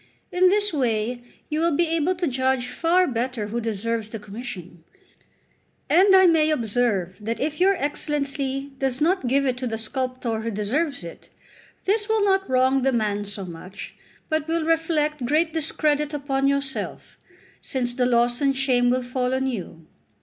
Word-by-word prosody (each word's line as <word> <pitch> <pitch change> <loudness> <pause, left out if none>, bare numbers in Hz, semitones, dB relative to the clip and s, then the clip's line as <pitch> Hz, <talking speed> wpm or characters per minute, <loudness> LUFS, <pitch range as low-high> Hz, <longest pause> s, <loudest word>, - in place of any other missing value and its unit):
In 365 +1 +4
this 410 0 +2
way 240 -3 0 0.3
you 305 0 -2
will 335 -2 +2
be 345 - +3
able 330 +3 +1
to 355 0 -2
judge 260 -2 0
far 350 +6 +2
better 240 -5 -2
who 235 +2 -2
deserves 225 0 -2
the 225 - -5
commission; 200 -5 -9 1.1
and 385 +2 +6
I 375 0 +7
may 320 -3 +4
observe 220 - 0
that 230 +2 -3
if 305 +2 -2
your 390 +1 +5
Excellency 280 -3 -2
does 265 -2 -1
not 330 -2 +1
give 275 +3 +2
it 255 -2 0
to 255 0 -3
the 225 -1 -3
sculptor 255 0 -3
who 230 - -3
deserves 240 - 0
it, 170 - -10 0.6
this 415 +2 +1
will 440 -2 +2
not 385 -1 +1
wrong 260 +1 +3
the 270 +1 +2
man 210 -4 -1
so 200 -1 -4
much, 180 +3 -9 0.3
but 315 -1 -1
will 325 -1 0
reflect 315 -3 0
great 315 +3 +1
discredit 300 -1 0
upon 275 -1 0
yourself, 280 -1 -3 0.4
since 245 -3 -2
the 250 0 +1
loss 240 +1 +2
and 275 -1 +2
shame 250 -2 +2
will 255 +1 +1
fall 250 +1 -1
on 265 0 0
you. 185 -10 -5
265 Hz, 170 wpm, -24 LUFS, 235-310 Hz, 1.1 s, I